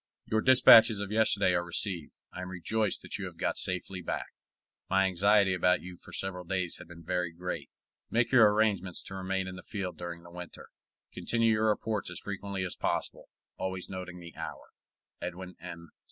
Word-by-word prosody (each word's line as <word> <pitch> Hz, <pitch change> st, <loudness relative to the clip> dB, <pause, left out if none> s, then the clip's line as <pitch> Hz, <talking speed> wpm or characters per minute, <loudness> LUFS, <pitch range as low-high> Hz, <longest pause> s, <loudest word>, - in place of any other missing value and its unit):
Your 110 Hz, 0 st, +1 dB
dispatches 115 Hz, -4 st, +8 dB
of 100 Hz, 0 st, -4 dB
yesterday 105 Hz, -4 st, +3 dB
are 85 Hz, 0 st, +2 dB
received. 85 Hz, -1 st, -2 dB, 0.2 s
I 90 Hz, -, -6 dB
am 90 Hz, -, -5 dB
rejoiced 105 Hz, +4 st, -1 dB
that -, -, -5 dB
you -, -, -3 dB
have -, -, -8 dB
got -, -, 0 dB
safely 90 Hz, 0 st, -3 dB
back. 85 Hz, -, -3 dB, 0.6 s
My 95 Hz, 0 st, +4 dB
anxiety 100 Hz, +1 st, +4 dB
about 90 Hz, 0 st, +3 dB
you 90 Hz, 0 st, -8 dB
for -, -, -15 dB
several 90 Hz, -1 st, -3 dB
days 90 Hz, -1 st, -1 dB
had 90 Hz, -, -11 dB
been 85 Hz, -1 st, -12 dB
very 90 Hz, 0 st, -1 dB
great. 90 Hz, +2 st, -5 dB, 0.4 s
Make 115 Hz, +1 st, +2 dB
your 115 Hz, -5 st, +7 dB
arrangements 100 Hz, -4 st, +1 dB
to -, -, -7 dB
remain 95 Hz, 0 st, -2 dB
in 95 Hz, 0 st, -6 dB
the -, -, -8 dB
field 90 Hz, -4 st, -5 dB
during 85 Hz, -1 st, -6 dB
the 85 Hz, -, -13 dB
winter. 90 Hz, 0 st, -9 dB, 0.4 s
Continue 115 Hz, -1 st, +2 dB
your 110 Hz, 0 st, +2 dB
reports 105 Hz, -2 st, -1 dB
as 90 Hz, -, -7 dB
frequently 100 Hz, -1 st, -4 dB
as 90 Hz, -, -3 dB
possible, -, -, -2 dB, 0.3 s
always 95 Hz, 0 st, -3 dB
noting 90 Hz, -1 st, -6 dB
the 85 Hz, -1 st, -11 dB
hour. -, -, -7 dB, 0.5 s
EDWIN 90 Hz, +1 st, -6 dB
M. 85 Hz, -2 st, -9 dB
95 Hz, 185 wpm, -30 LUFS, 90-100 Hz, 0.6 s, dispatches